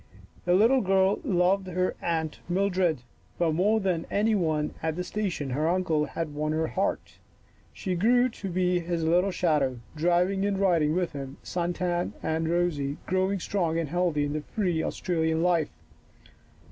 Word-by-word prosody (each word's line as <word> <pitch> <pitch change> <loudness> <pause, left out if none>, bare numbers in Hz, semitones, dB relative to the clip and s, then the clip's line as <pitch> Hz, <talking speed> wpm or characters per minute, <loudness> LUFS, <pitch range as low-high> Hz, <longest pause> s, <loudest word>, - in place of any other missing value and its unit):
The 175 0 +4
little 235 +7 +5
girl 190 +1 +2
loved 185 +1 +2
her 185 0 -1
Aunt 160 -2 -2
Mildred, 180 -6 +1 0.3
but 165 -2 +1
more 205 +7 +2
than 185 -5 -1
any 215 +2 +2
one 155 -6 0
at 160 -1 -1
the 180 - -2
station 180 -8 -3
her 150 +5 0
uncle 170 -4 +1
had 155 +1 -4
won 155 +1 -1
her 160 +1 +1
heart. 195 - -2 0.5
She 185 - -3
grew 245 +8 +4
to 205 -4 -7
be 180 0 +1
his 170 -1 -2
little 175 +4 +3
shadow, 150 -9 +1 0.2
driving 175 +4 +2
and 200 -1 0
riding 170 -6 +2
with 180 -2 0
him, 135 -1 -7
sun 175 0 -2
tanned 175 -1 -1
and 160 0 -1
rosy, 160 -5 0
growing 190 +1 0
strong 170 -3 -1
and 165 -3 -2
healthy 170 -3 +1
in 145 - -3
the 155 - -2
free 175 -2 -1
Australian 160 -2 -1
life. 170 -4 +2
175 Hz, 165 wpm, -27 LUFS, 160-190 Hz, 0.5 s, little